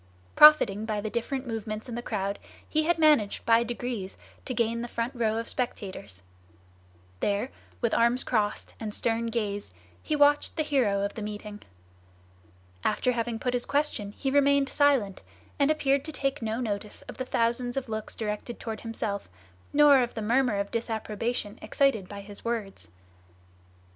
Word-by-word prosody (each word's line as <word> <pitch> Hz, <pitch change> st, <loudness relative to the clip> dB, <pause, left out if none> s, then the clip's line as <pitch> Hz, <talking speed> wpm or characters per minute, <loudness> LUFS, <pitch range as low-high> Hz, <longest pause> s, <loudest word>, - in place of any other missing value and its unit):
Profiting 230 Hz, -9 st, +7 dB
by 215 Hz, -2 st, -1 dB
the 210 Hz, +1 st, -4 dB
different 255 Hz, +3 st, -2 dB
movements 220 Hz, -1 st, -4 dB
in 240 Hz, -, -6 dB
the 240 Hz, -, -3 dB
crowd, 200 Hz, -3 st, -3 dB, 0.3 s
he 310 Hz, 0 st, +1 dB
had 345 Hz, +1 st, +2 dB
managed 300 Hz, -10 st, +3 dB
by 230 Hz, 0 st, +5 dB
degrees 235 Hz, -4 st, -4 dB, 0.3 s
to 255 Hz, -, -3 dB
gain 235 Hz, 0 st, 0 dB
the 240 Hz, -, -4 dB
front 235 Hz, +2 st, -3 dB
row 225 Hz, -3 st, 0 dB
of 230 Hz, -, -3 dB
spectators. 185 Hz, -, -5 dB, 1.0 s
There, 205 Hz, +5 st, 0 dB, 0.3 s
with 235 Hz, -2 st, +1 dB
arms 235 Hz, +2 st, +3 dB
crossed 210 Hz, -3 st, -1 dB
and 215 Hz, -2 st, -4 dB
stern 230 Hz, 0 st, 0 dB
gaze, 205 Hz, -, -3 dB, 0.3 s
he 305 Hz, -, -1 dB
watched 290 Hz, +2 st, +4 dB
the 310 Hz, -, +2 dB
hero 240 Hz, -10 st, +1 dB
of 200 Hz, -, -2 dB
the 220 Hz, -, -6 dB
meeting. 210 Hz, 0 st, -6 dB, 1.2 s
After 250 Hz, -, +1 dB
having 235 Hz, -1 st, -2 dB
put 250 Hz, +2 st, -2 dB
his 245 Hz, -1 st, -2 dB
question 285 Hz, -8 st, 0 dB
he 270 Hz, -, -2 dB
remained 280 Hz, -1 st, +4 dB
silent, 265 Hz, -10 st, +2 dB, 0.4 s
and 280 Hz, 0 st, +4 dB
appeared 280 Hz, -3 st, +2 dB
to 315 Hz, -, -5 dB
take 275 Hz, -1 st, -2 dB
no 225 Hz, +1 st, -2 dB
notice 210 Hz, -3 st, -4 dB
of -, -, -10 dB
the 255 Hz, -, -2 dB
thousands 240 Hz, +1 st, 0 dB
of 270 Hz, -1 st, -2 dB
looks 220 Hz, -1 st, -5 dB
directed 215 Hz, +2 st, -4 dB
toward 220 Hz, -2 st, -5 dB
himself, 220 Hz, -3 st, -4 dB, 0.4 s
nor 290 Hz, -2 st, +7 dB
of 245 Hz, -1 st, -1 dB
the 220 Hz, -, -3 dB
murmur 240 Hz, 0 st, +2 dB
of 200 Hz, 0 st, -3 dB
disapprobation 225 Hz, -1 st, -2 dB
excited 245 Hz, -10 st, +1 dB
by 200 Hz, -1 st, -7 dB
his 200 Hz, 0 st, -11 dB
words. 210 Hz, -, -3 dB
230 Hz, 165 wpm, -28 LUFS, 210-260 Hz, 1.2 s, Profiting